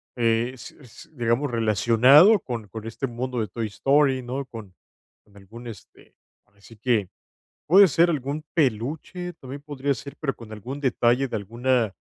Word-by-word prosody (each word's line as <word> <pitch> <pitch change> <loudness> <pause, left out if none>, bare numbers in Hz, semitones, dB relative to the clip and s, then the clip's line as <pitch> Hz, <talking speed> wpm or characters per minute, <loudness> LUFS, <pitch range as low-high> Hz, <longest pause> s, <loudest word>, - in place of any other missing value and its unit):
eh, 115 +1 +1
s 130 - -11
s 125 -6 -15
digamos, 120 +2 0
relacionado 120 - +5
con 115 - -6
con 110 +1 -8
este 135 +4 -4
mundo 120 0 -4
de 105 - -2
Toy 115 +3 -4
Story, 135 +4 +2
¿no? 130 +3 -4
Con 110 -7 -11 0.5
con 100 - -26
algún 110 +5 -12
este, 110 - -13 0.3
por - - -36
decir 105 +2 -17
que 110 -6 0 0.6
puede 195 +4 +7
ser 170 +5 +3
algún 150 0 -3
peluche, 155 - -2
también 140 -2 -10
podría 140 -1 -2
ser, 140 +4 -10
pero 135 -4 -2
con 115 -2 -13
algún 130 +7 -7
detalle 125 0 +2
de 115 - -4
alguna 115 +1 -1
125 Hz, 165 wpm, -24 LUFS, 115-140 Hz, 0.6 s, puede